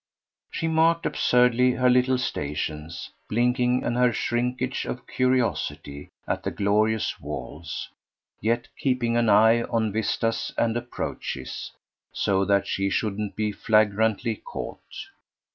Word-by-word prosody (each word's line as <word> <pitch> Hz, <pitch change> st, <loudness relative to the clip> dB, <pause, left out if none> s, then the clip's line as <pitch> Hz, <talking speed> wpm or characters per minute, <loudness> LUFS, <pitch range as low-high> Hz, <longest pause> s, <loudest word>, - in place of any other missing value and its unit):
She 165 Hz, -, -2 dB
marked 165 Hz, +1 st, +3 dB
absurdly 125 Hz, 0 st, +3 dB
her 125 Hz, 0 st, +2 dB
little 125 Hz, +1 st, +4 dB
stations, 75 Hz, -, -4 dB, 0.2 s
blinking, 125 Hz, +2 st, +2 dB
in 120 Hz, -, -1 dB
her 125 Hz, 0 st, +3 dB
shrinkage 125 Hz, +2 st, -1 dB
of 125 Hz, -, -5 dB
curiosity, 125 Hz, -, -1 dB, 0.2 s
at -, -, -1 dB
the -, -, -2 dB
glorious 105 Hz, +2 st, +1 dB
walls, 75 Hz, +6 st, -6 dB, 0.5 s
yet 115 Hz, +3 st, 0 dB
keeping 125 Hz, -4 st, +1 dB
an 120 Hz, -1 st, +3 dB
eye 110 Hz, +3 st, +6 dB
on 110 Hz, -2 st, 0 dB
vistas 110 Hz, +1 st, -1 dB
and 115 Hz, -1 st, +1 dB
approaches, 120 Hz, -, -5 dB, 0.4 s
so 95 Hz, -1 st, +1 dB
that 100 Hz, 0 st, +2 dB
she 100 Hz, 0 st, -1 dB
shouldn't 105 Hz, -1 st, -2 dB
be 105 Hz, 0 st, -1 dB
flagrantly 110 Hz, +1 st, +2 dB
caught. -, -, -7 dB
115 Hz, 120 wpm, -25 LUFS, 100-125 Hz, 0.5 s, eye